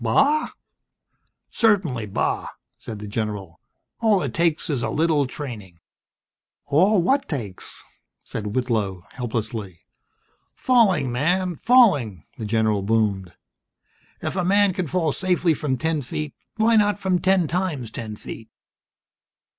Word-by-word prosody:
"Bah?" 290 Hz, +3 st, +3 dB, 1.0 s
"Certainly 185 Hz, -, +2 dB
bah!" 100 Hz, -, -1 dB, 0.3 s
said 110 Hz, -, -7 dB
the 105 Hz, 0 st, -7 dB
general. 100 Hz, -5 st, -4 dB, 0.4 s
"All 215 Hz, -6 st, +3 dB
it 135 Hz, -5 st, -3 dB
takes 170 Hz, 0 st, +1 dB
is 140 Hz, -7 st, -1 dB
a -, -, -1 dB
little 155 Hz, -3 st, +2 dB
training." 110 Hz, -, -8 dB, 0.9 s
"All 180 Hz, +7 st, +3 dB
what 275 Hz, +7 st, +1 dB
takes?" 110 Hz, -, -6 dB, 0.4 s
said 105 Hz, -1 st, -5 dB
Whitlow, 110 Hz, -8 st, -1 dB
helplessly. 110 Hz, -7 st, -4 dB, 0.7 s
"Falling, 200 Hz, -, +3 dB
man, 175 Hz, +8 st, 0 dB
falling!" 145 Hz, -, +4 dB, 0.2 s
the 110 Hz, -, -4 dB
general 110 Hz, -1 st, +1 dB
boomed. 100 Hz, -4 st, 0 dB, 0.9 s
"If -, -, -2 dB
a 185 Hz, -, 0 dB
man 200 Hz, +1 st, +3 dB
can 180 Hz, -1 st, -2 dB
fall 165 Hz, -1 st, 0 dB
safely 180 Hz, 0 st, +1 dB
from 140 Hz, -3 st, -2 dB
ten 160 Hz, +1 st, -1 dB
feet 150 Hz, +3 st, -5 dB, 0.2 s
Why 225 Hz, +1 st, +3 dB
not 205 Hz, -1 st, +3 dB
from 190 Hz, -3 st, 0 dB
ten 190 Hz, -2 st, +2 dB
times 160 Hz, -, -2 dB
ten 110 Hz, -2 st, -6 dB
feet!?" 110 Hz, +1 st, -9 dB
145 Hz, 125 wpm, -23 LUFS, -, 1.0 s, falling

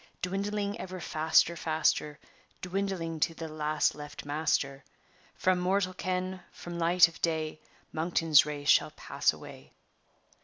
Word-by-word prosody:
Dwindling 200 Hz, +3 st, -2 dB
ever 185 Hz, 0 st, -6 dB
faster, 160 Hz, +1 st, +2 dB
faster, 155 Hz, -2 st, 0 dB, 0.5 s
Dwindling 180 Hz, -3 st, -2 dB
to 165 Hz, +2 st, +1 dB
the 165 Hz, -, -6 dB
last 155 Hz, 0 st, 0 dB
left 150 Hz, 0 st, -9 dB
master; 145 Hz, -2 st, -1 dB, 0.5 s
From 185 Hz, -1 st, +2 dB
mortal 185 Hz, +1 st, +1 dB
ken, 185 Hz, 0 st, -3 dB
from 175 Hz, 0 st, -8 dB
light 170 Hz, +1 st, +6 dB
of 165 Hz, -, -14 dB
day, 155 Hz, -2 st, -1 dB, 0.3 s
Monkton's 165 Hz, -2 st, +4 dB
race 145 Hz, -1 st, -6 dB
shall -, -, +5 dB
pass -, -, 0 dB
away." -, -, -12 dB
165 Hz, 125 wpm, -30 LUFS, 155-185 Hz, 0.5 s, light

